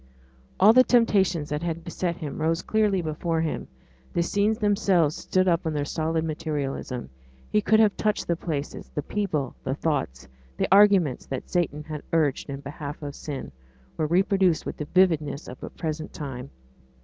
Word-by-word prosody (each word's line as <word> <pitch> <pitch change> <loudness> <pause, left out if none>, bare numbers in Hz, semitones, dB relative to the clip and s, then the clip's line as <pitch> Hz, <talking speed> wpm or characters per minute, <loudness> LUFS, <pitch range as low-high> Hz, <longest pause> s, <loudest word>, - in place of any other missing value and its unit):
All 210 +4 +8
the 255 +1 +8
temptations 195 -11 +3
that 150 +1 -2
had 170 -1 -3
beset 170 0 -2
him 155 -1 -5
rose 165 +2 +1
clearly 210 -4 +1
before 160 +1 -1
him; 160 - -3 0.5
the 170 - +2
scenes 205 +5 +1
themselves 195 -7 +2
stood 185 0 0
up 170 -2 +2
in 160 - -1
their 145 -1 0
solid 160 +1 -1
materialism 145 - -3 0.4
he 210 - +3
could 220 +1 +4
have 215 -2 +4
touched 210 -1 0
the 170 - +1
places; 155 -4 -5
the 150 - -1
people, 155 -11 -2
the 130 0 -1
thoughts, 135 - -2 0.3
the - - +1
arguments 195 -8 +5
that 135 - -5
Satan 160 -4 0
had 155 -1 -6
urged 150 -4 +1
in 140 0 -5
behalf 145 +1 -7
of 145 -1 -5
sin, 140 - -6 0.4
were 155 - 0
reproduced 190 0 +2
with - - -5
the 150 - -4
vividness 160 -4 +2
of 125 - -9
a - - -6
present 155 -1 -5
time. 135 -3 -6
160 Hz, 175 wpm, -26 LUFS, 145-190 Hz, 0.5 s, All